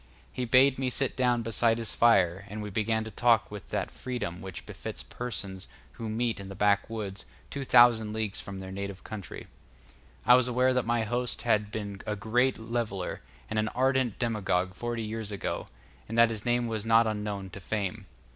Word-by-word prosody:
He 125 - -2
bade 130 +2 +5
me 130 -1 0
sit 135 +1 0
down 125 -2 +2
beside 115 0 +2
his 115 -2 0
fire, 100 -5 +4
and 105 +1 -5
we 105 - -6
began 110 +2 0
to 110 - -7
talk 115 -7 +3
with 105 -3 -8
that - - -2
freedom 120 -9 -4
which 95 -2 -7
befits - - -6
persons 100 -6 -5 0.2
who 115 -1 -6
meet 115 0 -1
in 100 -1 -8
the 95 - -7
backwoods, 100 0 0 0.2
two 140 - -3
thousand 120 -4 +6
leagues 110 -2 -2
from 100 -1 -7
their 95 0 -7
native 100 0 -5
country. 105 -4 -7 0.8
I 125 - +8
was 125 0 +6
aware 125 +1 +3
that 125 -2 0
my 120 -1 +2
host 120 +2 -2
had 105 -3 +2
been 100 -2 -5
a 105 - 0
great 120 +5 +1
leveller 110 -5 -3 0.3
and 110 - -1
an 110 - +1
ardent 130 -3 +2
demagogue 95 -6 0
forty 120 +3 -3
years 110 -1 -4
ago, 100 - -3 0.4
and 115 - -3
that 115 -1 +6
his 110 -2 -5
name 120 0 +2
was 110 -2 -2
not 115 +1 +5
unknown 105 -3 -3
to 100 - -8
fame. 100 +1 -3
110 Hz, 190 wpm, -29 LUFS, 100-120 Hz, 0.8 s, I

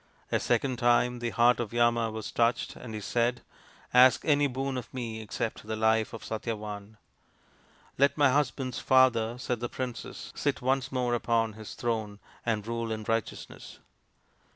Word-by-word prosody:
A - - +2
second 130 -3 0
time 120 0 +3
the 120 0 -2
heart 120 +1 +4
of 115 -4 -3
Yama 120 -1 +2
was 110 -1 -6
touched, 120 0 +1
and 115 -3 -8
he - - -3
said, 120 +3 0 0.5
"Ask 125 +1 +6
any 145 -2 +4
boon 135 +1 -3
of 125 -3 -6
me 115 -3 -5
except 110 0 -4
the 110 - -2
life 110 0 +2
of 115 - -8
Satyavan." 105 -2 -5 0.5
" - - -32
Let 140 +1 +4
my 145 -3 +5
husband's 130 -2 0
father," 120 -3 +3
said 125 -1 -2
the 120 0 -3
princess, 125 -2 -6
" - - -33
sit - - -1
once 130 +1 0
more 125 -2 0
upon 115 -2 +1
his 110 0 -9
throne 110 -3 -2 0.3
and 110 -3 0
rule 115 0 -3
in 110 -1 -3
righteousness." 115 -1 -4
120 Hz, 170 wpm, -29 LUFS, 110-125 Hz, 0.5 s, Ask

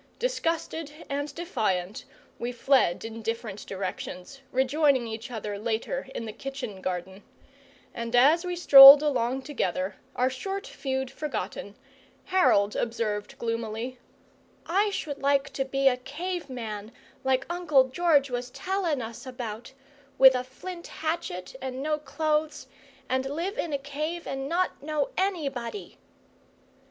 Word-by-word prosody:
Disgusted 330 -10 -2 0.2
and 285 +1 -2
defiant 210 - -2 0.3
we 240 +1 -2
fled 245 -7 +2
in 225 0 -7
different 225 -2 -4
directions, 190 +5 -6
rejoining 265 0 +2
each 225 +2 -6
other 210 -4 -5
later 230 - -2
in 230 - -4
the 215 - -6
kitchen 250 -5 -6
garden; 185 +1 -4 0.7
and 235 0 -3
as 295 +8 +5
we 360 -1 -3
strolled 280 -3 +11
along 265 -2 0
together, 190 - -2 0.2
our 250 - +2
short 390 +10 -4
feud 265 -1 -3
forgotten, 215 -8 -5 0.5
Harold 210 - +3
observed, 220 -3 -2
gloomily: 230 +2 -3 0.7
"I 400 +5 +2
should 295 -7 -4
like 275 0 +2
to 270 0 -1
be 270 0 +1
a 250 -2 +4
cave 325 +5 -5
man, 220 -4 -6 0.3
like 265 0 +1
Uncle 340 -6 +3
George 285 -2 +3
was 245 0 -3
tellin' 350 -4 -2
us 225 +3 -8
about: 235 -2 -6 0.5
with 265 0 +9
a 250 0 -1
flint 340 +7 -9
hatchet 315 - -4
and 260 0 -4
no 305 0 0
clothes, 310 -1 -1 0.4
and 260 0 0
live 340 +8 -3
in 335 - -2
a 285 - +1
cave 305 +5 -4
and 270 0 -4
not 360 +2 0
know 295 -1 -1
anybody!" 315 - -3
265 Hz, 135 wpm, -27 LUFS, 230-310 Hz, 0.7 s, strolled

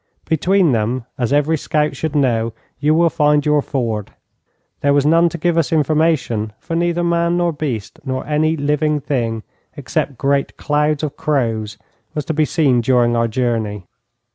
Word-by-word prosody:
Between 175 +1 +2
them, 115 +2 -1
as 120 0 0
every 150 +3 +2
scout 150 +1 0
should 160 -1 -3
know, 115 -5 +1 0.3
you 150 +2 +2
will 170 0 +3
find 150 -1 +2
your 150 -1 +3
ford. 115 -7 -3 0.7
There 140 0 +2
was 145 -1 +2
none 165 +2 +4
to 170 - -6
give 170 0 +1
us 160 - -1
information, 150 -8 +1
for 165 - -5
neither 175 0 0
man 170 0 +1
nor 175 -1 +1
beast, 135 -9 -4
nor 130 -1 -3
any 155 +2 +1
living 150 +1 0
thing 115 -6 -2 0.3
except 135 - -2
great 140 +1 0
clouds 150 0 0
of 150 - -3
crows, 115 -8 -1 0.4
was 150 -2 -2
to 160 - -2
be 155 0 +2
seen 145 -5 +2
during 120 -1 +2
our 115 0 +2
journey. 110 -5 -2
145 Hz, 165 wpm, -18 LUFS, 120-155 Hz, 0.7 s, none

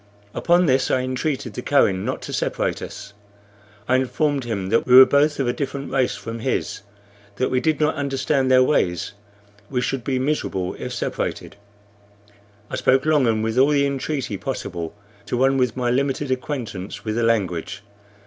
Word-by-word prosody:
Upon 175 +1 +3
this 130 -3 +2
I 130 - +2
entreated 130 -2 -2
the 125 - -5
Kohen 100 -10 +2
not - - -3
to - - -6
separate - - -1
us. 100 0 -8 0.7
I 130 - +3
informed 140 +1 0
him 100 -5 -3
that 115 +3 +1
we 125 - +6
were 130 +1 +11
both 145 +2 +2
of 135 - 0
a 120 - +1
different 140 0 -4
race 130 -2 +1
from 115 0 -7
his, 130 +3 -2 0.5
that 130 - -1
we 130 - +2
did 155 +2 0
not 155 0 +2
understand 135 -1 0
their 130 0 +6
ways; 90 - 0 0.6
we 130 - -1
should 125 0 -2
be 130 +1 -1
miserable 130 -9 -1
if - - -5
separated. - - -4 1.1
I - - -4
spoke 130 +2 +2
long 150 -5 +3
and 110 -1 +1
with 115 +2 0
all 135 +2 +5
the 140 -1 +3
entreaty 135 -5 -2
possible 90 -9 -5 0.3
to 125 - -1
one 135 +2 +3
with 125 -1 0
my 120 -1 0
limited 135 +1 0
acquaintance 120 -8 -4
with 110 - -1
the 120 - -1
language. 100 -8 -1
130 Hz, 175 wpm, -22 LUFS, 115-140 Hz, 1.1 s, were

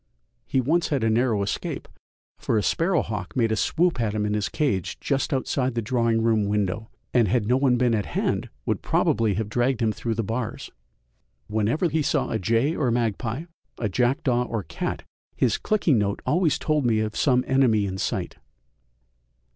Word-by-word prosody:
He 130 - +1
once 160 +7 +1
had 140 -6 -1
a 115 - +2
narrow 115 -3 +2
escape, 100 - -4 0.5
for 115 - 0
a 105 - +1
sparrow 170 0 +1
hawk 105 -4 -5
made 115 -3 +2
a - - +2
swoop 165 - +1
at 110 -2 -1
him 105 -1 0
in 105 - -1
his 105 -1 -1
cage 130 - -1
just 140 -2 -1
outside 130 -1 0
the 115 - 0
drawing 115 -1 +1
room 110 -2 +2
window, 105 +1 -1 0.2
and 120 -4 +4
had 110 +2 +1
no 125 +4 +3
one 130 -2 +3
been 120 -1 +2
at 105 -3 0
hand - - -1 0.2
would - - -1
probably 110 -3 +1
have 110 +1 -2
dragged 120 +3 0
him 110 -3 +2
through 115 +1 -3
the 115 - -1
bars. 115 +2 -4 0.7
Whenever 110 - 0
he 160 0 0
saw - - 0
a 110 - 0
jay 115 - +1
or 135 -5 +1
magpie, 115 +3 -1 0.3
a 110 - -1
jackdaw 125 +2 +1
or 115 -4 -3
cat, - - -4 0.3
his 120 -5 +1
clicking 170 - +2
note 100 -1 -1
always 165 -1 +2
told 155 -2 0
me 115 -3 +2
of 110 0 -2
some 125 -3 +3
enemy 125 -6 +3
in 95 -1 -4
sight. - - -3
115 Hz, 185 wpm, -25 LUFS, 110-130 Hz, 0.7 s, and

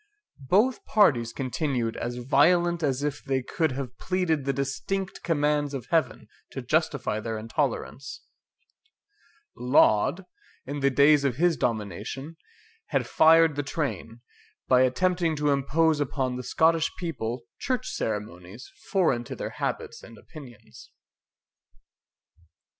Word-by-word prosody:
Both 225 +6 +3
parties 135 - +3
continued 130 -3 -2
as 120 0 -4
violent 170 +7 +2
as 140 -2 -1
if 150 0 -3
they 135 -2 -1
could 160 +1 -1
have 125 -2 -6
pleaded 180 -6 -1
the 140 - +1
distinct 185 +9 -3
commands 150 -3 0
of 125 -5 -6
Heaven 165 -2 0 0.3
to 135 - -5
justify 140 -5 0
their 110 0 -4
intolerance, 130 +3 -3 1.3
Laud, 125 - +3 0.4
in 145 +2 -5
the 140 0 +3
days 140 +2 +4
of 135 -4 0
his 175 +2 +2
domination, 115 +7 -4 0.5
had - - 0
fired 160 -1 +5
the 145 - -1
train, 135 -6 -4 0.5
by 125 -1 +5
attempting 165 +6 +1
to 150 -1 +1
impose 150 +3 +2
upon 130 -3 -1
the 125 - -4
Scottish 160 +5 +2
people 125 -8 -4 0.2
church 255 0 -2
ceremonies 105 +1 -5 0.2
foreign 160 -11 +2
to - - -7
their - - -5
habits - - -4
and 115 - -14
opinions. 130 -8 -14
140 Hz, 125 wpm, -26 LUFS, 125-160 Hz, 1.3 s, fired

